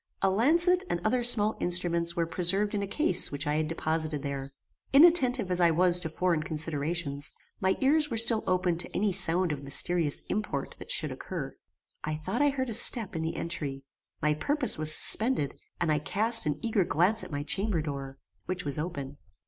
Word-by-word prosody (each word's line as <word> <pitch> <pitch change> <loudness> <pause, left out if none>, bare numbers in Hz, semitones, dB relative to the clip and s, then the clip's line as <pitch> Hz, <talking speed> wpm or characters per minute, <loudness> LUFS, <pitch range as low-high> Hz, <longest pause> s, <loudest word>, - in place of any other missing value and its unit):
A 195 - +2
lancet 335 - +2
and 175 - -2
other 245 +3 0
small 220 -3 +6
instruments 170 -1 +1
were 170 -2 -1
preserved 195 +5 0
in 205 - -2
a 200 - -4
case 310 - +2
which 145 +1 -4
I 150 +1 -1
had 155 0 -2
deposited 155 -2 -3
here. 140 -1 -6 0.4
Inattentive 265 - +4
as 180 - 0
I 170 -1 +4
was 175 +2 +2
to 160 - -5
foreign 170 0 -1
considerations, 155 -2 -2 0.3
my 190 0 0
ears 295 +3 +2
were 230 - -4
still 225 -1 +2
open 180 -2 -1
to - - -3
any 205 +1 0
sound 175 0 +1
of 145 -2 -5
mysterious 145 +2 +1
import 205 -10 -4
that - - -12
should - - 0
occur. - - -7 0.5
I 155 0 -4
thought 160 - -4
I 290 - +3
heard 260 -3 -4
a - - -5
step 225 -2 +5
in 160 - -3
the 160 0 -4
entry. 140 -5 -5 0.4
My 150 0 +2
purpose 285 - 0
was 155 0 +4
suspended, 215 - +2 0.3
and 170 -3 -1
I 150 - 0
cast 220 +5 +3
an 145 -1 -2
eager 220 -4 0
glance 180 +7 0
at - - -10
my 145 -1 -5
chamber 185 +1 -2
door, 135 -2 -7 0.3
which 180 -1 -5
was 145 0 -2
open. 145 -4 -6
175 Hz, 195 wpm, -27 LUFS, 155-215 Hz, 0.5 s, small